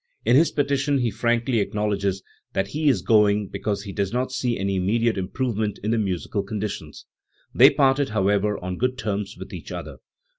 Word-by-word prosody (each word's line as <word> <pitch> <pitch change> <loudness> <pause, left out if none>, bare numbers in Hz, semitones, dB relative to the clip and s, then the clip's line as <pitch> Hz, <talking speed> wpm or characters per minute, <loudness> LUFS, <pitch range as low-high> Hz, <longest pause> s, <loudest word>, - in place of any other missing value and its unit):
In 125 - +4
his 160 +4 +5
petition 140 0 +1
he 120 -3 0
frankly 120 +2 +1
acknowledges 100 -2 -1 0.3
that 95 +1 -1
he 150 0 +1
is 110 -10 +1
going 105 -2 +3
because 100 -2 -3
he 100 -2 -7
does 100 -2 -1
not 125 +2 -1
see 125 -2 -1
any 100 0 -1
immediate 115 +5 +1
improve 105 +5 -2
ment 105 -2 -1
in 110 - 0
the 115 - +2
musical 100 0 -2
conditions*. 100 -6 -6 0.5
They - - +8
parted, 135 0 +2
however, 105 0 +1
on 90 0 -5
good 125 +1 0
terms 105 -3 -3
with - - -9
each - - -8
other. - - -7
105 Hz, 185 wpm, -24 LUFS, 100-125 Hz, 0.5 s, They